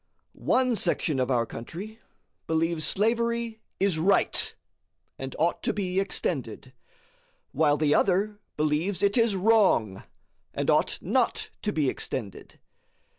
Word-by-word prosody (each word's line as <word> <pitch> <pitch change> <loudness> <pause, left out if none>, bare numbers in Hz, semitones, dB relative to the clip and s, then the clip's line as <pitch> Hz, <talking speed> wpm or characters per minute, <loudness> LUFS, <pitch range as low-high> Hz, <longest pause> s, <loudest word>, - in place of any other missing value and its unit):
One 255 -2 +1
section 165 -7 0
of 130 0 0
our 120 -3 +2
country 190 - -8 0.5
believes 160 0 0
slavery 235 +1 0 0.2
is 195 -5 +2
RIGHT, 195 +4 +2 0.6
and 135 0 -6
ought 170 +2 +1
to - - -1
be 190 -2 -1
extended, 195 - -3 0.8
while 150 -2 +2
the 150 -1 +2
other 205 +2 +1 0.2
believes 155 +6 0
it 200 0 +3
is 230 -4 +3
WRONG, 190 - +3 0.5
and - - +1
ought - - +2
not - - 0
to 210 - -1
be 155 -7 0
extended. 115 -5 -5
185 Hz, 125 wpm, -27 LUFS, 150-210 Hz, 0.8 s, it